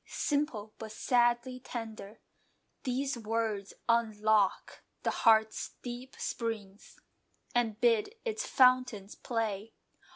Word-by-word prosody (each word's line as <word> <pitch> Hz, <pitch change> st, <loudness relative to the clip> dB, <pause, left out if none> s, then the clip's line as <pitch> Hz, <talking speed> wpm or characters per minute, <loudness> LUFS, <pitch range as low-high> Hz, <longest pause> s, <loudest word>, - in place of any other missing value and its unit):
Simple, 270 Hz, -8 st, -1 dB
but 220 Hz, -1 st, -7 dB
sadly 240 Hz, +2 st, +2 dB
tender, 225 Hz, -5 st, -7 dB, 0.6 s
These 260 Hz, 0 st, -1 dB
words 220 Hz, -3 st, -2 dB
unlock 220 Hz, -3 st, +2 dB, 0.2 s
the -, -, +1 dB
heart's 220 Hz, -1 st, +3 dB
deep 245 Hz, +2 st, -7 dB
springs 215 Hz, -4 st, -5 dB, 0.5 s
And 225 Hz, -3 st, +1 dB
bid 235 Hz, -, +3 dB
its 450 Hz, +1 st, -1 dB
fountains 250 Hz, -6 st, +3 dB
play. 225 Hz, -2 st, -3 dB
230 Hz, 95 wpm, -31 LUFS, 215-250 Hz, 0.6 s, heart's